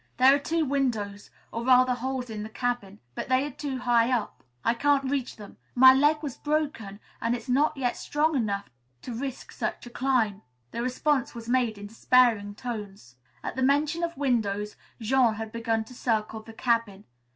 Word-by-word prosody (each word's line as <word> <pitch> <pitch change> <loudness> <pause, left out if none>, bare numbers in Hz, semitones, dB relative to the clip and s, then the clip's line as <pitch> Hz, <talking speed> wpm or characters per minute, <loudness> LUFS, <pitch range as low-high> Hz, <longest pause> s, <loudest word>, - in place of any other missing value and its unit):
"There 260 +2 +7
are 285 - +3
two 320 +3 0
windows, 225 -8 -2 0.2
or 230 - -4
rather 255 0 +5
holes 250 -1 -3
in 215 -1 -5
the 215 - -6
cabin, 230 -4 -3
but - - -5
they 260 +2 +3
are 295 - -5
too 275 0 -4
high 240 -1 +2
up. 240 -4 -2 0.2
I - - +4
can't 275 +1 +1
reach 275 -3 -2
them. 205 -2 -12 0.2
My 260 +1 +9
leg 295 +3 +3
was 280 -5 -5
broken 285 -10 -2 0.2
and 230 +1 +1
it's 245 - -8
not 285 +4 +2 0.2
strong 305 +1 0
enough 200 -5 -1
yet 120 0 -36
to 245 - -5
risk 265 +2 -5
such - - -4
a 240 - -10
climb." 240 -6 +1 0.3
This 235 - -3
response 255 +1 0
was 230 -1 -8
made 240 -3 +1
in 205 - -8
despairing 225 -2 +3
tones. 205 - -7 0.3
At - - -4
the 260 - -2
mention 290 +5 +2
of 335 -3 -2
windows, 210 -7 0 0.2
Jean 235 0 +3
had 220 0 -6
begun 225 -1 -1
to 235 - -14
circle 220 -2 -1
the 225 +1 -12
cabin. 230 -4 0
245 Hz, 185 wpm, -27 LUFS, 220-265 Hz, 0.3 s, My